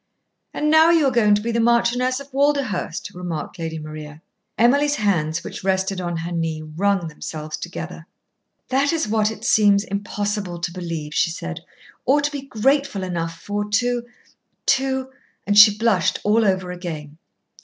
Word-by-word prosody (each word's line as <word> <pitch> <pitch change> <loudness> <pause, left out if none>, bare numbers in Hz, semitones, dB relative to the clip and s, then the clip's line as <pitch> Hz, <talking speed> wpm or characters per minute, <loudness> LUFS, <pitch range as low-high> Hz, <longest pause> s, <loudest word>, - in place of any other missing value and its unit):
"And 300 0 0
now 315 +1 +7
you 330 -3 +4
are 270 - +3
going 215 -4 +4
to 210 - -2
be 235 - -1
the 230 - 0
Marchioness 240 +2 +2
of 280 -1 -12
Walderhurst," 275 - 0
remarked 175 -3 -5
Lady 160 -1 -4
Maria. 155 0 -9 0.3
Emily's 285 +5 +4
hands, 170 - 0
which - - -7
rested 190 0 0
on 175 -1 -3
her 165 +2 -4
knee, 165 -2 -2
wrung 175 +3 0
themselves 155 0 -6
together. 175 -1 -7 0.6
"That 275 +2 +2
is 325 -8 0
what 215 0 +2
it 220 - -8
seems 205 -2 +4
impossible 205 -2 -3
to 175 0 -3
believe," 165 -4 -5
she - - +2
said, 85 - -5 0.4
"or 280 +3 +3
to 290 0 -1
be 285 -2 -4
grateful 270 -3 0
enough 165 -2 -3
for 205 +3 -3
to 240 +2 0 0.6
to 265 -1 +1 0.2
" - - -43
and 205 - +1
she 210 0 +8
blushed 215 -7 +2
all 215 +2 +3
over 185 -2 0
again. 160 -4 -7
205 Hz, 165 wpm, -22 LUFS, 170-245 Hz, 0.6 s, she